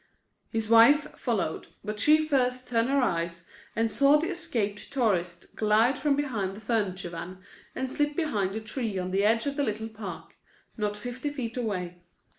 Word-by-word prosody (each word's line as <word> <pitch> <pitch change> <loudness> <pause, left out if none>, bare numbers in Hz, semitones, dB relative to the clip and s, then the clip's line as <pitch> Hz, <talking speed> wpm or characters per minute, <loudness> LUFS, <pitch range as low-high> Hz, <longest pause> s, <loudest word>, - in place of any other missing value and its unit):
His 225 -2 -2
wife 230 +7 +6
followed, - - -2 0.2
but 210 0 -4
she 310 +6 +4
first 255 -3 +1
turned 230 0 +1
her 280 - +2
eyes 170 -4 -2 0.3
and 225 0 +1
saw 280 +4 +5
the 320 +3 -1
escaped 225 - -3
tourist 180 -10 -1
glide 220 +4 +3
from 290 -2 +2
behind 220 -10 -2
the - - -9
furniture 200 -5 -1
van 175 +2 -7 0.4
and 260 - -2
slip 290 +3 0
behind 210 - -1
a 220 - -3
tree 220 -2 -3
on 185 0 -3
the 195 +1 +2
edge 225 +4 +3
of 280 0 -2
the 285 - +2
little 220 -2 -2
park, 205 -6 -8 0.4
not 210 -2 -2
fifty 245 +6 -4
feet 255 -5 -5
away. 180 -7 -3
225 Hz, 175 wpm, -28 LUFS, 200-265 Hz, 0.4 s, wife